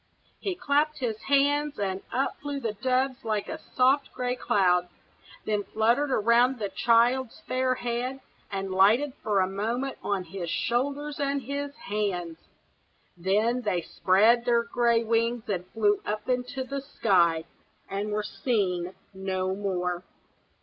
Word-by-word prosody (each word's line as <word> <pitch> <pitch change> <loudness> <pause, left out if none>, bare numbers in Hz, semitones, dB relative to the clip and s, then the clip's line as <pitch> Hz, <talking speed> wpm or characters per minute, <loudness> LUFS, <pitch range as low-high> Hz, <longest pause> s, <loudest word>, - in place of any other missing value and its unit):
He 380 -3 -2
clapped 305 -3 +1
his 225 -4 -3
hands, 285 +1 +2
and 195 -1 -2
up 265 +2 -1
flew 285 -1 -3
the 225 -5 -2
doves 260 +4 0
like 215 -2 -1
a - - -5 0.2
soft 265 +2 +3
gray 250 0 -2
cloud. 180 -6 +2 0.6
Then 210 -1 0
fluttered 235 +8 +1
round 240 +3 +4
the 205 -3 -3
child's 240 +3 +2
fair 255 0 0
head, 245 +2 -3 0.3
and 195 -1 -3
lighted 225 +9 +4
for 205 -3 +2
a 185 - +2
moment 230 +8 -2
on 195 -2 -1
his 180 0 -6
shoulders 280 - -1
and 280 -1 0
his 280 +3 -4
hands; 195 - -3 0.8
then 210 +7 +1
they 185 -7 -1
spread 215 +9 +3
their 235 -1 +3
gray 235 0 +2
wings 230 +1 0
and 185 -3 -2
flew 210 -1 +1
up 210 +1 -4
into 250 +1 -1
the 275 +1 -4
sky, 175 - +2 0.4
and 200 +2 -3
were 210 0 -1
seen 190 -6 -1 0.2
no 190 -1 -2
more. 180 -3 -2
230 Hz, 145 wpm, -27 LUFS, 195-260 Hz, 0.8 s, round